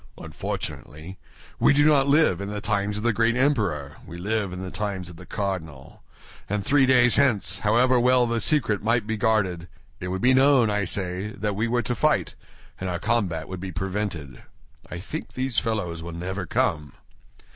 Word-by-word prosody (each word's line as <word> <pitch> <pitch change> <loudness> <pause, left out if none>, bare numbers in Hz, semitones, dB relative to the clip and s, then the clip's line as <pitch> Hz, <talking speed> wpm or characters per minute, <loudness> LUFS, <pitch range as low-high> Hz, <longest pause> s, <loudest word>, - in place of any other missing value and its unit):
Unfortunately, 80 +6 -7 0.4
we - - +5
do 145 +1 +4
not 145 -3 +4
live 140 - +3
in 100 - -4
the 105 0 -4
times 100 +1 -1
of 105 - -5
the 120 -1 +2
great 115 +2 +2
emperor, 100 - 0
we 85 - -10
live 100 +1 -2
in 90 - -6
the 95 - -6
times 100 -4 -4
of 85 - -11
the 90 +2 -13
cardinal; 80 -9 -5 0.5
and 100 0 -2
three 135 0 +4
days 125 -2 +5
hence, 105 -9 +2
however 120 +5 +3
well 125 0 +4
the 115 -1 -1
secret 110 -2 +3
might 115 0 +1
be 110 +1 -2
guarded, 95 -6 0 0.3
it 90 - -5
would 95 +1 -3
be 130 +1 +5
known, 130 -4 +4
I 105 -1 0
say, 95 +1 -3
that 105 0 -3
we 110 +3 0
were 120 +1 0
to 120 - -1
fight, 115 - +1 0.5
and 95 - -3
our 90 - -2
combat 95 -6 -1
would 95 -1 -6
be 95 0 -6
prevented. 90 -5 -4 0.5
I 85 - -6
think 115 - -7
these 130 -2 0
fellows 95 -8 -3
will 85 0 -7
never 90 +2 -5
come." 75 -3 -1
105 Hz, 190 wpm, -24 LUFS, 90-120 Hz, 0.5 s, we